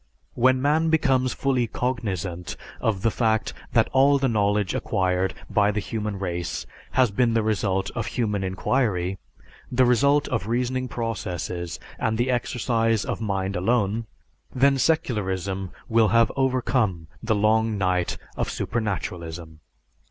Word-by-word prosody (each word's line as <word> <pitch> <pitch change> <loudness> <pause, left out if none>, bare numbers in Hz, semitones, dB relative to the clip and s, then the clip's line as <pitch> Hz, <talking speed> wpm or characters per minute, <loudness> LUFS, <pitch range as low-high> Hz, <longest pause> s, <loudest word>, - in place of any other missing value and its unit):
When 130 +1 +3
man 155 +3 +3
becomes 130 -5 +2
fully 130 -3 0
cognizant 100 -9 -3 0.2
of 105 -3 -1
the 115 - +3
fact 110 -1 0 0.2
that 115 -2 +4
all 140 +2 +5
the 135 -1 +1
knowledge 105 -3 +1
acquired 90 0 0
by 105 -1 +3
the 105 0 0
human 105 -1 -3
race 90 -2 -3 0.3
has 130 -5 +3
been 115 +2 +2
the 115 - +2
result 100 -3 0
of 115 -2 -3
human 105 -5 -1
inquiry, 95 -1 0 0.5
the 130 +1 +4
result 140 +4 +3
of 110 -5 -2
reasoning 125 +2 -1
processes, 90 - -4 0.2
and 110 0 0
the 120 +2 +1
exercise 115 -3 0
of - - -3
mind 100 -2 -1
alone, 105 +3 +1 0.4
then 135 +1 +3
secularism 100 - 0 0.2
will 115 -1 +4
have 115 +2 +4
overcome 125 -9 +1 0.2
the 110 -1 +1
long 110 +1 +2
night 90 -2 0 0.2
of - - -2
supernaturalism. 85 -7 -4
110 Hz, 135 wpm, -24 LUFS, 95-125 Hz, 0.5 s, all